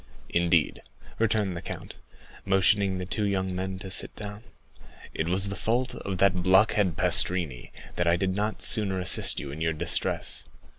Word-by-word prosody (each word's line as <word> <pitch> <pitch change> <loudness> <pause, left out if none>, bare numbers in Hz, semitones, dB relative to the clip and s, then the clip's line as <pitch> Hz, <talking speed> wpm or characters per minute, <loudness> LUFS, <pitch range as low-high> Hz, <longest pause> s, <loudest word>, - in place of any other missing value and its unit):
"Indeed," 85 -2 +1 0.4
returned 105 -4 0
the 85 - -6
count, - - -8 0.5
motioning 95 0 +2
the 90 - -4
two 105 +4 -1
young 95 -2 -1
men 95 +1 -4
to 95 0 -8
sit - - 0
down. 105 +1 -8 0.7
"It 80 - -2
was 95 +3 +2
the 100 - -4
fault 120 +5 -1
of 95 -2 -5
that 90 -1 +2
blockhead 95 -1 +3
Pastrini, 80 -10 +1 0.3
that 85 - 0
I 85 - +4
did 95 +2 -1
not 105 +2 -3
sooner 100 -3 +3
assist 90 +1 +3
you 70 - -7
in 75 +3 -8
your 80 0 0
distress. 85 +2 -1
95 Hz, 165 wpm, -26 LUFS, 85-100 Hz, 0.7 s, I